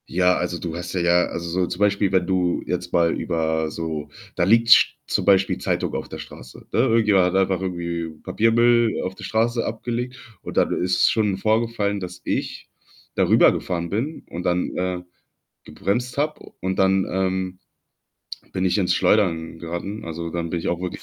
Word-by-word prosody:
Ja, 90 +1 +3
also, 90 -1 -2
du 85 -2 -5
hast 90 +1 -6
ja 95 - -1
ja 85 0 +4
also, 85 0 -5
so 90 +2 0
zum 90 - -5
Beispiel, 100 -1 +2
wenn 95 -2 +2
du 90 -2 +1
jetzt 90 0 -3
mal 85 -1 +3
über 80 -2 -1
so 80 -2 -4 0.3
da - - +1
liegt 115 +5 +4
sch - - +6
zum - - 0
Beispiel 95 -1 +3
Zeitung - - -2
auf - - -4
der - - -7
Straße, 60 0 -11
ne? - - 0
Irgendjemand 110 -6 +4
hat - - -1
einfach 95 -1 +2
irgendwie 85 -3 -3
Papiermüll 120 +1 +3
auf 95 - -3
der - - -11
Straße 115 +1 0
abgelegt 120 +2 -4 0.2
und - - -8
dann - - +3
ist 90 0 +2
schon 105 -4 +1
vorgefallen, 110 -1 0
dass 90 -1 -8
ich - - -3 0.5
da - - +2
rübergefahren 85 -2 +3
bin 130 +10 -3
und 90 - -6
dann, 90 0 0
äh, 90 0 -2 0.6
gebremst 120 +6 -2
habe 150 +2 -2
und 95 0 -2
dann, 95 0 +3
ähm, 95 0 -1 0.9
bin 95 -1 -1
ich 95 - +2
ins 95 -3 +2
Schleudern 85 -6 +1
geraten. 85 +5 -5
Also, 85 0 -5
dann 85 0 -3
bin 85 - -2
ich - - -3
auch 85 - -1
wirklich 90 -1 -5
95 Hz, 185 wpm, -23 LUFS, 85-105 Hz, 0.9 s, sch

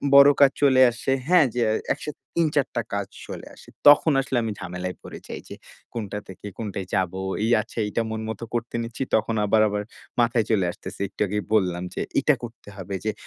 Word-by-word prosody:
বড় 140 0 +10
কাজ 140 -1 +8
চলে 130 -2 +5
আসে, 120 +3 -3 0.2
হ্যাঁ? 180 -4 +6
যে 125 - -1 0.3
একসাথে 150 0 -7 0.2
৩-৪ 150 -4 +2
টা 120 - +1
কাজ 100 -1 -1 0.2
চলে - - -7
আসে। - - -16 0.2
তখন 145 +2 +8
আসলে 130 -2 -2
আমি 110 - -2
ঝামেলায় 90 0 -5
পড়ে - - -9
যাই, - - -6
যে - - -8 0.4
কোনটা 105 -3 -4
থেকে, 95 +1 -11
কোনটায় 100 -4 -4
যাব। 95 -2 +1 0.3
এই 115 - +1
আচ্ছা - - -14
এইটা 110 - -1
মন 110 0 -3
মতো 110 +1 -5
করতে 120 0 -3
নিচ্ছি, 115 +3 -4
তখন 110 +1 +1
আবার, 110 +1 +4
আবার 105 0 -2 0.4
মাথায় 115 -1 +2
চলে 95 -5 +3
আসতেছে, - - -9
একটু - - -10
আগেই 105 +1 -2
বললাম, 90 -4 +2
যে - - -3 0.2
এটা - - +4
করতে 115 -3 -9
হবে, 100 0 -7
যে 110 - +2
110 Hz, 200 wpm, -24 LUFS, 100-130 Hz, 0.4 s, বড়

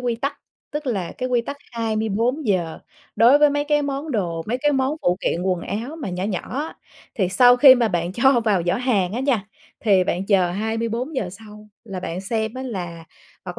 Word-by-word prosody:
quy 245 -2 -1
tắc, 280 +4 -3 0.3
tức 295 0 -5
là 195 -9 -2
cái 255 0 -2
quy 245 -1 +2
tắc 280 +5 -6 0.2
24 225 +4 -1
giờ 175 -5 0 0.4
đối 235 +6 +6
với 295 0 +5
mấy 290 0 0
cái 295 0 +2
món 280 +2 -3
đồ, 175 -9 -2
mấy 245 +3 -1
cái 295 +2 +2
món 270 +2 0
phụ 175 0 +2
kiện 175 - -1
quần 185 -2 0
áo 240 - -5
mà 285 - -5
nhỏ 180 +1 -4
nhỏ 200 -3 -2 0.2
á. 310 +2 -4 0.4
Thì 190 -5 0
sau 245 +6 +6
khi 260 0 +9
mà 240 -3 +1
bạn 175 -2 -2
cho 240 +3 +4
vào 205 -6 +1
giỏ 175 - +2
hàng 215 -8 0
á 235 - -2
nha, 255 -7 0 0.3
thì 195 -5 +3
bạn 185 +3 -2
chờ 185 -4 +3
24 225 - -2
giờ 215 -9 -2
sau 210 +2 -13 0.2
là 195 -5 -6
bạn 180 0 -4
xem 220 +3 -2
á 260 - -5
là 175 -9 -6 0.4
hoặc - - -7
225 Hz, 215 wpm, -22 LUFS, 190-260 Hz, 0.4 s, khi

